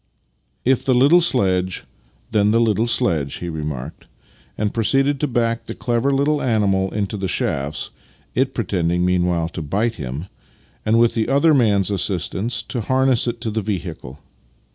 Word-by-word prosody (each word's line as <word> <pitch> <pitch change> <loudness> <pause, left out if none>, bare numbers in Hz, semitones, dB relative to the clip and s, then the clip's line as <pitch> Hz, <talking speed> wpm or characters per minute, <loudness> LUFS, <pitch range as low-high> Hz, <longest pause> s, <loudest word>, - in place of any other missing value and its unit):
If 130 0 +2
the 130 - +2
little 145 +8 +6
sledge, 95 - +1 0.5
then 105 -2 +3
the 115 +2 +3
little 115 0 +2
sledge," 80 - +1
he 85 - -5
re 80 -2 -4
marked, 75 0 -6 0.5
and 105 -1 -1
proceeded 135 +5 +2
to 150 - 0
back 115 -2 -1
the - - -5
clever 120 +2 0
little 145 +2 +1
animal 100 -5 +1
into 105 0 -2
the 95 -1 -2
shafts 70 -3 -2 0.4
(it - - 0
pretending 90 -1 0
meanwhile 90 -2 +1
to 85 - -6
bite 105 +10 -1
him) 65 +7 -5 0.6
and, 110 +1 +4
with 115 0 +4
the 115 0 -1
other 140 +4 +4
man's 105 -7 +2
assistance, 95 +3 -1
to 120 - -4
harness 130 +1 +2
it 120 0 -2
to 115 -3 -2
the 110 +1 -1
vehicle. 85 -9 -5
105 Hz, 165 wpm, -20 LUFS, 90-120 Hz, 0.6 s, little